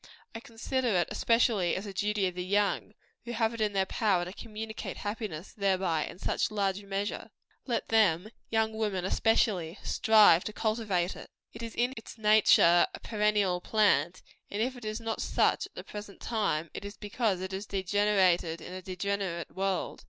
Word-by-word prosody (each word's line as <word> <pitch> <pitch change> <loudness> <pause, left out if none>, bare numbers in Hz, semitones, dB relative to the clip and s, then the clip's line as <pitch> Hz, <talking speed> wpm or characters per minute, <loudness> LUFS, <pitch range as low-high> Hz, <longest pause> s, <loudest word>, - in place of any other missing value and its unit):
I 225 - -6
consider 245 +3 -3
it 180 -6 +2
especially 230 -6 +2
as 195 - -4
a 200 - -7
duty 205 +1 0
of 180 - -1
the 180 0 -4
young, 205 +2 0 0.3
who 240 - -5
have 225 -1 +1
it 230 - -5
in 210 -1 +1
their 190 -1 +2
power 190 -4 +1
to 180 - -7
communicate 220 0 -7
happiness 205 -5 -5
thereby 185 -6 0
in - - -9
such - - -1
large 200 -2 -1
measure. 200 +1 -4 0.4
Let 240 - -2
them 190 -7 +4
let 215 +2 -13 0.2
young 220 0 +1
women 210 -4 -2
especially 190 -5 +1
strive 210 -6 +5
to 215 - -4
cultivate 210 -5 -1
it. - - -11 0.2
It 225 - -9
is 230 -1 -6
in 245 +2 +1
its 225 - -10
nature 210 -5 +5
a - - -10
perennial 210 -4 +1
plant; 185 -6 +2 0.3
and 205 - -4
if 250 +4 0
it 245 -3 -10
is 215 +1 -3
not 225 -1 -3
such - - +1
at - - -33
the - - -7
present 205 -1 -9
time, 195 -9 -1
it - - -7
is 200 0 -8
because 210 -2 -1
it 185 +1 -5
has 195 +2 -5
degenerated 190 -4 +2
in 180 - -9
a 185 - -6
degenerate 185 -2 -3
world. 190 -1 -2
205 Hz, 185 wpm, -29 LUFS, 185-220 Hz, 0.4 s, strive